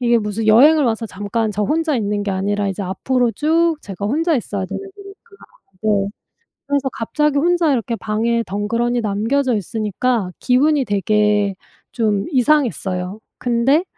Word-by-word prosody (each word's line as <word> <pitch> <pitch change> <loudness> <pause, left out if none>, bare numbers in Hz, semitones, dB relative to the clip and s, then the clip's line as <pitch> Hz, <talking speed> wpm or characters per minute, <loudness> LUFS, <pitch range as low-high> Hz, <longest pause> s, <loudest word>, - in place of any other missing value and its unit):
이게 235 -1 +3
무슨 210 +1 -3
여행을 285 +7 +6
와서 225 -1 -1
잠깐 210 +3 -2
저 210 +2 -1
혼자 315 +7 0
있는 205 -2 -1
게 200 - -1
아니라 200 +1 -1
이제 195 +1 -4
앞으로 240 +6 0
쭉 325 +3 +2
제가 200 0 -5
혼자 320 +7 +1
있어야 200 -4 -3
되는 - - -5
거니까 395 0 -13 0.6
네 205 -2 +1 0.6
그래서 280 -1 0
갑자기 295 +5 0
혼자 345 -1 +2
이렇게 230 -2 -1
방에 225 +2 -1
덩그러니 230 +5 -1
남겨져 230 +5 0
있으니까 215 0 -1
기분이 275 +2 +2
되게 205 -1 +1 0.4
좀 210 -4 0
이상했어요. 225 -9 0 0.2
근데 250 +7 +2
230 Hz, 325 characters per minute, -19 LUFS, 205-275 Hz, 0.6 s, 여행을